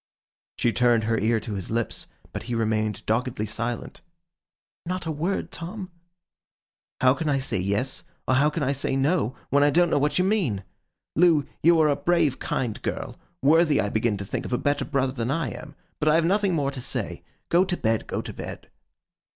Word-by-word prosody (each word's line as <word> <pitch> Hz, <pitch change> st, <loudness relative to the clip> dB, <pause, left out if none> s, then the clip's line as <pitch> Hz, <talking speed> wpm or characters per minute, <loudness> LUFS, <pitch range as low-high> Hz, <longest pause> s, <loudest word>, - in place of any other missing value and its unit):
She 120 Hz, -, +1 dB
turned 120 Hz, -2 st, +3 dB
her 115 Hz, +1 st, +1 dB
ear 110 Hz, +2 st, +2 dB
to 110 Hz, -1 st, -5 dB
his 95 Hz, -3 st, -5 dB
lips, 115 Hz, 0 st, -2 dB, 0.3 s
but -, -, -4 dB
he 120 Hz, -, 0 dB
remained 110 Hz, -2 st, 0 dB
doggedly 115 Hz, 0 st, 0 dB
silent. 115 Hz, +2 st, -4 dB, 0.8 s
'Not 180 Hz, +1 st, -3 dB
a 160 Hz, -, -1 dB
word, 165 Hz, +6 st, -2 dB
Tom?' 185 Hz, +3 st, -6 dB, 1.1 s
'How 130 Hz, 0 st, +6 dB
can 155 Hz, +1 st, -2 dB
I 140 Hz, -, +2 dB
say 130 Hz, -8 st, -1 dB
Yes, 100 Hz, +8 st, -1 dB, 0.3 s
or -, -, +3 dB
how 140 Hz, +3 st, +4 dB
can 155 Hz, 0 st, -2 dB
I 135 Hz, -, +1 dB
say 135 Hz, -1 st, -1 dB
No, 135 Hz, -, +1 dB, 0.2 s
when 140 Hz, -, +4 dB
I 145 Hz, -, +5 dB
don't 175 Hz, +4 st, +3 dB
know -, -, +3 dB
what 145 Hz, +1 st, +1 dB
you 180 Hz, -, +3 dB
mean? 170 Hz, -, +1 dB, 0.5 s
Loo, 160 Hz, -3 st, +5 dB, 0.2 s
you 170 Hz, +1 st, +5 dB
are 155 Hz, -, +5 dB
a 145 Hz, -, +3 dB
brave, 170 Hz, -6 st, +1 dB
kind 115 Hz, -5 st, -2 dB
girl, -, -, -4 dB, 0.3 s
worthy 155 Hz, +1 st, +5 dB
I 105 Hz, -, +1 dB
begin 110 Hz, 0 st, 0 dB
to 100 Hz, -, -5 dB
think -, -, -3 dB
of -, -, -5 dB
a -, -, +3 dB
better 145 Hz, +2 st, 0 dB
brother 135 Hz, -1 st, 0 dB
than 120 Hz, -2 st, -2 dB
I 150 Hz, -2 st, 0 dB
am. -, -, -9 dB, 0.2 s
But 155 Hz, -, +2 dB
I 155 Hz, -, +5 dB
have 165 Hz, 0 st, +3 dB
nothing 195 Hz, 0 st, +2 dB
more 140 Hz, -3 st, 0 dB
to 135 Hz, -2 st, -6 dB
say. -, -, -3 dB, 0.3 s
Go 175 Hz, +2 st, +5 dB
to 180 Hz, -2 st, -2 dB
bed, 110 Hz, -1 st, 0 dB
go -, -, -3 dB
to -, -, -7 dB
bed. -, -, -8 dB
135 Hz, 205 wpm, -25 LUFS, 115-165 Hz, 1.1 s, How